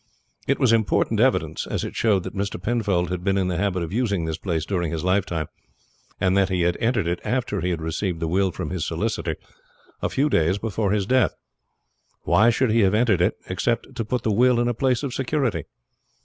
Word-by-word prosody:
It - - +2
was 120 -3 +4
important 110 -2 +1
evidence, - - +1
as - - -2
it - - -6
showed 100 -5 +2
that - - -6
Mr. 100 +1 -3
Penfold 100 -7 0
had 90 -1 -3
been 95 0 +1
in 95 -1 +1
the 90 - -1
habit 95 -2 0
of 85 +2 -6
using 100 -7 0
this 80 -1 -3
place 80 -5 -2
during 85 -5 -1
his 80 -2 -3
lifetime, 90 -4 0 0.7
and 95 0 +2
that 100 0 +3
he 90 -2 0
had 85 0 +2
entered 115 -4 +1
it 85 +1 -1
after 120 -3 -1
he 90 - -1
had 85 -3 -2
received 85 +2 -2
the 80 - -2
will 95 +3 +2
from - - -5
his - - -2
solicitor - - -2 0.7
a - - 0
few 140 +3 +1
days 85 - +2
before 110 -1 -2
his 100 -2 +1
death. 125 -3 +2 0.9
Why 95 +7 +4
should 120 0 +2
he 115 - +3
have 100 -1 +3
entered 110 -6 +3
it 90 +5 +2
except 115 +6 -1
to 115 - -2
put 125 +3 -2
the 110 - +1
will 125 +2 +4
in 120 - +1
a 120 - +1
place 125 +2 0
of 135 -4 -3
security? 130 - -1
100 Hz, 220 wpm, -23 LUFS, 90-115 Hz, 0.9 s, was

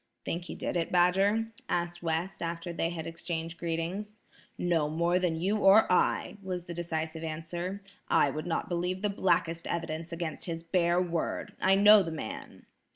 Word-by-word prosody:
"Think 170 +1 -3
he - - -7
did - - -3
it, 165 - -1
Badger?" 195 +5 +3 0.2
asked 175 0 -1
West 170 +3 -2
after 170 +1 -3
they 165 0 0
had 165 -2 -5
exchanged 165 0 -5
greetings. 175 +6 -3 0.4
"No 165 -4 +1
more 170 +3 +2
than 170 -3 0
you 195 +5 +1
or 205 +1 +7
I," 180 - +2
was 180 -2 -4
the 170 - -6
decisive 160 -1 -3
answer. 170 +5 -4 0.2
"I 140 - +4
would 155 +4 -5
not 165 - -1
believe 180 +2 -2
the 210 - +1
blackest 170 -3 +1
evidence 165 0 -3
against 170 -2 -4
his 165 -1 -4
bare 170 0 +2
word. 170 -2 -2
I 190 +1 +5
know 205 +1 +8
the 170 - -3
man." 155 -9 -7
170 Hz, 170 wpm, -30 LUFS, 165-185 Hz, 0.4 s, know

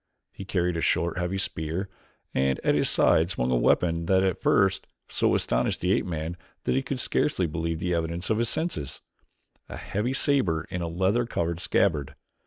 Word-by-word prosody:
He 100 - -9
carried 90 -2 0
a - - -2
short, 85 +3 +1
heavy 90 +2 -1
spear, 85 +1 -2 0.5
and 65 0 +1
at - - +3
his - - +2
side 80 +2 +3
swung 65 -9 -1
a - - +3
weapon 85 +7 +2
that 95 -1 +4
at 95 -2 0
first 95 -1 +2 0.2
so - - +1
astonished - - 0
the 90 - 0
ape - - +1
man 80 0 -4 0.3
that - - 0
he 135 - +2
could 135 -1 -4
scarcely 105 -6 +1
believe 85 +1 -2
the 90 0 -1
evidence 85 +3 -2
of 110 - +2
his 115 -1 +1
senses 160 - -3 0.7
a - - -7
heavy 110 +6 -2
saber 130 - +1
in 90 -1 -3
a 85 - -2
leather 95 +8 +1
covered 85 -6 -2
scabbard. 75 -7 0
90 Hz, 190 wpm, -26 LUFS, 80-95 Hz, 0.7 s, that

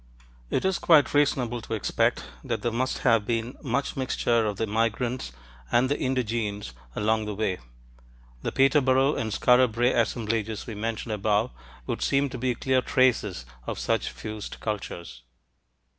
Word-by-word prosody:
It - - 0
is 190 -1 +1
quite 155 -4 +5
reasonable 125 -5 +2
to 110 - -4
expect 105 - 0 0.2
that 115 -3 -3
there 120 - +1
must 130 +3 -1
have 115 -4 +5
been 115 +3 -2
much 140 0 -1
mixture 120 -3 +1
of 105 -2 -3
the 110 - 0
migrants 115 - -1 0.4
and 125 +2 +3
the 145 - 0
indigenes 115 - -2 0.2
along 110 +1 +1
the 105 -1 -4
way; 95 -3 -1 0.8
the - - -2
Peterborough 135 0 +4
and 110 -1 -2
Skara 125 +2 +4
Brae 120 +3 +2
assemblages 110 -2 -1
we 115 - -6
mentioned 110 +1 -3
above 105 +3 +1 0.3
would - - -3
seem 140 0 +2
to 130 -1 -6
be 125 0 0
clear 130 +2 +1
traces 115 - +1 0.2
of - - -3
such - - 0
fused 110 -1 -7
cultures. 95 - -5
115 Hz, 155 wpm, -26 LUFS, 110-130 Hz, 0.8 s, quite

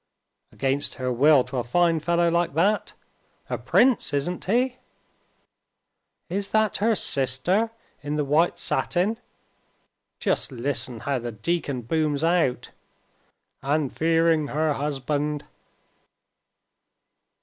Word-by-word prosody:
"Against 135 +2 -2
her 130 -1 -2
will 140 +2 +5
to 135 - -6
a 120 - 0
fine 165 +6 +2
fellow 170 +2 +1
like 170 -3 0
that? 200 +6 +1 0.6
A - - 0
prince, 250 - +2
isn't 175 +6 -2
he?" 250 +5 +1 1.5
"Is 195 +3 -3
that 220 -1 +1
her 220 +2 +2
sister 140 - +1 0.3
in 145 +1 -3
the 150 -1 0
white 155 +5 +2
satin? 200 +6 0 1.0
Just - - 0
listen 120 -2 -2
how 140 -2 -1
the 120 0 -5
deacon 135 +2 -3
booms 150 +3 0
out, 165 -8 +1 0.9
'And 145 0 -1
fearing 165 -1 +2
her 155 +1 0
husband. 145 +1 -2
150 Hz, 110 wpm, -24 LUFS, 135-175 Hz, 1.5 s, will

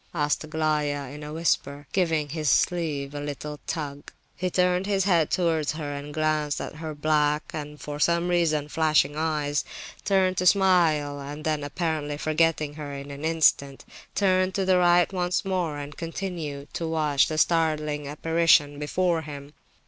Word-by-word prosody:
asked 150 -1 0
Aglaya, 150 -3 -1
in 150 - -9
a 150 0 -7
whisper, 145 -3 -1
giving 165 -5 +1
his 155 0 -1
sleeve 145 -2 +1
a 145 - -4
little 145 +1 -6
tug. 145 -3 -5 0.2
He 185 0 -2
turned 180 +1 +1
his 195 -2 +1
head 170 -5 +3
towards 160 -4 +1
her 150 -2 -5
and 145 +1 -6
glanced 155 -1 0
at - - -6
her 155 -1 -6
black 150 0 +1
and 150 -1 -6
(for 145 0 -6
some 170 +2 +2
reason) 165 -4 +1
flashing 155 -1 +2
eyes, 150 -2 0 0.4
tried 190 -2 +2
to 180 - +2
smile, 170 -7 +3
and 145 +2 -7
then, 155 -2 0
apparently 150 -1 -2
forgetting 155 -1 +1
her 145 -1 -7
in 140 +1 -7
an 140 +1 -8
instant, 155 -4 +2 0.3
turned 185 -1 +2
to 195 -2 0
the 185 -1 +4
right 175 +1 +4
once 180 +1 -1
more, 180 -6 -1
and 145 0 -8
continued 165 -5 -5
to 170 -1 -3
watch 150 -3 +2
the 155 - -3
startling 155 -3 +1
apparition 150 -1 +2
before 170 +3 0
him. 145 -1 -9
155 Hz, 165 wpm, -26 LUFS, 145-170 Hz, 0.4 s, the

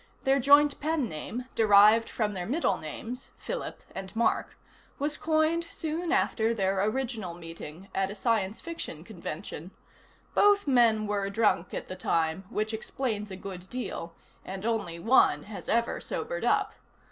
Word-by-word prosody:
Their 270 +1 +3
joint 285 +2 +5
pen 305 -3 0
name, 220 +9 -5
derived 215 +1 +6
from 210 -2 -1
their 180 -2 -4
middle 300 +9 +1
names 225 - -6
(Philip - - -5
and 190 +2 -7
Mark), 235 - +1 0.4
was 290 +2 -1
coined 315 +2 +1
soon 330 +1 -3
after 230 -11 +2
their 195 -2 +1
original 220 -6 -2
meeting, 165 +1 -9
at 195 0 0
a 205 - -6
science 215 -1 0
fiction 325 - -6
convention. 175 -3 -7 0.6
Both 410 0 +5
men 230 -5 +4
were 200 -1 -1
drunk 200 -4 +1
at - - -5
the 185 - -6
time, 165 0 0
which 215 +1 -2
explains 220 -2 -3
a 190 - -6
good 185 -1 -8
deal, 205 -9 -5 0.3
and 190 +2 -6
only 220 -7 -1
one 170 - +4
has 205 -1 -8
ever 235 +1 +1
sobered - - -3
up. - - +2
220 Hz, 150 wpm, -29 LUFS, 190-265 Hz, 0.6 s, derived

